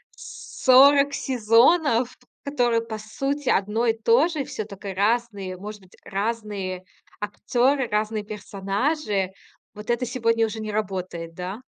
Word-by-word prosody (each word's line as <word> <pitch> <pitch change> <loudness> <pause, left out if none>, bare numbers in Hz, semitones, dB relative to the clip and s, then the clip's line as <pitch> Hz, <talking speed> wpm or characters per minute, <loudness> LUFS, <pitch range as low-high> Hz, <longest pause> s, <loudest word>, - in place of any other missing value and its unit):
40 280 - +4
сезонов, 250 +2 +3 0.3
которые 245 -5 +1
по 225 -1 -6
сути 275 +6 -3
одно 210 +4 +1
и 225 - +3
то 230 +7 +3
же. 310 -5 -3
Всё 215 -4 -5
только 200 -1 -7
разные, 205 -3 0
может 210 +1 -8
быть, 185 - -20
разные 200 -3 -3 0.4
актёры, 245 +5 0
разные 210 0 -1
персонажи. 205 +1 -2 0.4
Вот 210 +2 -10
это 240 +1 0
сегодня 230 -2 +1
уже 220 +1 -6
не 215 -1 -4
работает, 185 -5 -4
да? 185 +6 -6
220 Hz, 130 wpm, -24 LUFS, 205-255 Hz, 0.4 s, 40